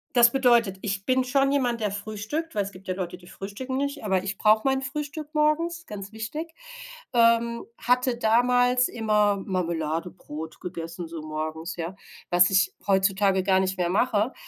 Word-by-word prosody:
Das 235 -1 +7
bedeutet, 240 -7 +3
ich 195 -1 -2
bin 260 0 +2
schon 275 +2 +2
jemand, 245 -5 0
der 210 - +1
frühstückt, 215 +10 -4
weil 205 - +1
es 200 - -7
gibt 190 0 -15
ja 185 - 0
Leute, 180 -1 -5
die 175 - -18
frühstücken 230 +9 -6
nicht, 280 -1 -2
aber 190 -3 +1
ich 195 0 -3
brauche 215 0 +4
mein 270 0 +1
Frühstück 295 +2 -5
morgens, 330 +3 +1
ganz 200 0 -7
wichtig. 300 +10 -6 0.6
Ähm. 235 0 +3
Hatte 250 0 +1
damals 245 +2 +3
immer 210 -3 +2
Marmeladebrot 165 -3 -4
gegessen 170 -1 -6
so 165 -1 -7
morgens, 155 +2 -4
ja, 170 +2 -4 0.3
was 175 +1 +5
ich 190 0 +3
heutzutage 195 0 +3
gar 190 -1 +3
nicht 190 0 -1
mehr 175 -1 0
mache. 215 +4 +1
210 Hz, 165 wpm, -26 LUFS, 185-250 Hz, 0.6 s, Das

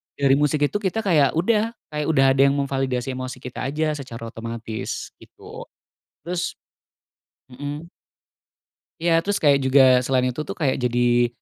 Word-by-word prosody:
dengerin 140 0 +3
musik 150 0 +1
itu 205 - -2
kita 205 +1 -1
kayak 155 -8 +3
udah, 215 +6 +1 0.2
kayak 150 -1 -2
udah 135 -4 +3
ada 135 - +2
yang 140 - +1
memvalidasi 135 -2 -1
emosi 130 0 -6
kita 125 - -6
aja 155 +2 -1
secara 120 -5 -8
otomatis, 115 -1 -6
gitu. - - -12 0.6
Terus 180 +1 -2 1.0
mhm. 145 +5 -7 1.1
Ya 165 0 +3
terus 200 +2 -2
kayak 140 -2 +5
juga 130 -1 +5
selain 125 0 +1
itu 140 - -5
tuh - - -5
kayak 140 -6 0
jadi 120 -1 +2
140 Hz, 145 wpm, -22 LUFS, 125-155 Hz, 1.1 s, kayak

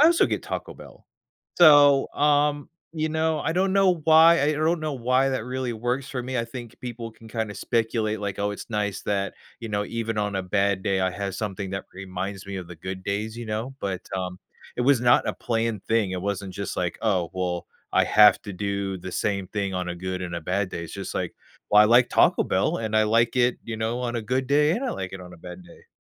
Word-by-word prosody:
I - - +8
also 340 0 +4
get - - -2
Taco - - -5
Bell. - - -15 0.5
So, 145 -4 +7
um, 145 0 +2 0.2
you 155 -1 -1
know, 160 0 0
I 160 - -1
don't 190 +2 +1
know 190 -2 +4
why, 165 +1 +7
I - - +2
I - - +2
don't 160 +3 +1
know 155 -1 -2
why 130 +2 +2
that 130 -4 -2
really 130 -1 -3
works 120 +4 -2
for 125 -2 -3
me. 130 +1 -4
I 115 - 0
think 120 -1 -9
people 120 -2 -6
can 110 0 -15
kinda 110 -2 -3
speculate, 110 -2 -1
like, 100 -2 -4
"Oh, 100 0 0
it's 105 - -8
nice 105 -2 -1
that, 100 -1 -1 0.3
you 115 - -6
know, 105 0 0
even 115 -2 -3
on 105 -1 -1
a 95 - -1
bad 100 0 0
day, 95 -2 0
I 95 0 +1
have 100 +1 -4
something 100 -1 -4
that 95 0 -5
reminds 95 +1 -6
me 100 -1 -5
of 90 -2 -7
the 90 - -10
good 95 +3 -6
days, 105 +3 -3
you 120 - -6
know?" 110 +5 -4
but, 95 -2 -3
um, 90 -1 -4 0.4
it 125 - 0
was 135 -1 +4
not 120 0 +4
a - - 0
planned 115 -3 -2
thing. 110 -4 +1
It 90 - -3
wasn't 100 -1 -3
just, 100 -2 -4
like, 90 -2 -2
"Oh, 95 -7 +1
well, 90 -2 -2 0.3
I - - +4
have 105 0 +6
to 100 - -7
do 100 0 -3
the 90 +1 -8
same 100 -2 -1
thing 100 -2 -2
on 90 -1 -2
a 90 - -3
good 95 +1 -4
and 85 -1 -5
a 85 - -3
bad 95 +4 -1
day." 85 -1 -5
It's 80 - -10
just, - - -6
like, - - -3 0.4
"Well, 105 - +7
I - - +5
like 120 +2 +5
Taco - - +4
Bell - - +1
and 110 -1 -3
I 110 - +4
like 115 +2 +2
it, 125 0 +3
you 110 -1 -5
know, 115 +2 -2
on 120 -1 -2
a 115 - -1
good 130 +4 -1
day 150 +2 +4
and 235 +9 -2
I 255 - -1
like 95 -1 -5
it 95 - -8
on 90 0 -11
a - - -16
bad 90 +2 -10
day." - - -17
110 Hz, 245 wpm, -25 LUFS, 95-130 Hz, 0.5 s, I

